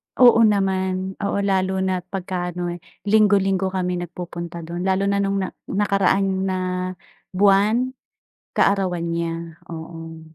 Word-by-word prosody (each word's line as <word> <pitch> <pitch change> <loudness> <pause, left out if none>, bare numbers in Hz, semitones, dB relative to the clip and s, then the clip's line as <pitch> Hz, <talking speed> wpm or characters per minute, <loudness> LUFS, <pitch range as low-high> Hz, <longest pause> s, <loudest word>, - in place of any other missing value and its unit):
Oo 245 -2 +7
naman, 190 -2 0
oo, 200 -1 -1
lalo 190 -1 +1
na't 185 -1 -1
pagka-ano 180 -2 -3
eh, 175 - -6 0.2
linggo-linggo 200 -2 +3
kami 180 -1 -1
nag-pupunta 170 -1 -6
dun, 175 +3 -4
lalo 190 +1 +2
na 200 - +1
nung 200 0 0
na 185 - -4 0.2
nakaraan 195 -1 +1
na 185 -1 0 0.8
buwan, 205 +6 +4 0.6
kaarawan 190 -3 +2
niya, 165 -1 -3
oo. 165 0 -8
190 Hz, 120 wpm, -22 LUFS, 175-195 Hz, 0.8 s, Oo